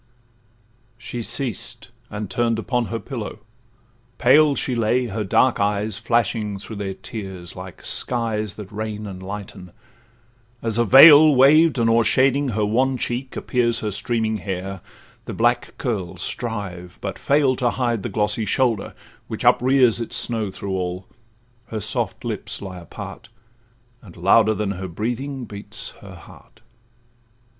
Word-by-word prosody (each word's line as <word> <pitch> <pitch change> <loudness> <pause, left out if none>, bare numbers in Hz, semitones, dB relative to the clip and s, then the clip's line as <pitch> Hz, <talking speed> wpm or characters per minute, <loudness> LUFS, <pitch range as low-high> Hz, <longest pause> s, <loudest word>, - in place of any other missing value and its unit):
She 120 0 -6
ceased, 120 -1 -5 0.2
and 105 0 -5
turn'd 115 +2 0
upon 120 +1 -1
her 115 - -3
pillow; 115 -2 -6 0.8
pale 145 +3 +5
She 130 - -2
lay, 120 +2 +1
her 110 -1 -3
dark 120 +6 +2
eyes 105 0 0
flashing 110 -2 0
through 105 +2 -9
their 95 -2 -4
tears, 95 -6 -8
Like 90 -1 -10
skies 110 -4 0
that 105 -2 -9
rain 105 0 -5
and 95 -2 -8
lighten; 95 -2 -8 0.9
as 115 -1 -2
a 120 - +3
veil, 145 +4 +9
Waved 150 +4 +6
and 115 -1 +2
o'ershading 130 +4 +3
her 105 0 +1
wan 130 +5 +1
cheek, 125 +2 -4
appears 120 -2 0
Her 105 - -2
streaming 110 +1 -1
hair; 95 -2 -5 0.4
the - - -6
black - - +1
curls 95 -7 -3
strive, 95 -7 -5
but - - -5
fail, 140 -2 +2
To 125 - +1
hide 120 -3 -1
the 120 - -4
glossy 105 +2 0
shoulder, 115 -3 0 0.3
which - - -5
uprears 125 -2 +4
Its 115 - -5
snow 110 -4 -1
through 95 +1 -5
all;—her 110 +6 -7
soft - - -3
lips - - -3
lie 95 -2 -7
apart, 85 +6 -10 0.7
And 90 -7 -15
louder 110 +5 +4
than 105 -2 -2
her 95 -1 -5
breathing 125 +8 -4
beats 100 -1 -5
her 95 -2 -11
heart. 100 +5 -17
110 Hz, 140 wpm, -22 LUFS, 100-120 Hz, 0.9 s, veil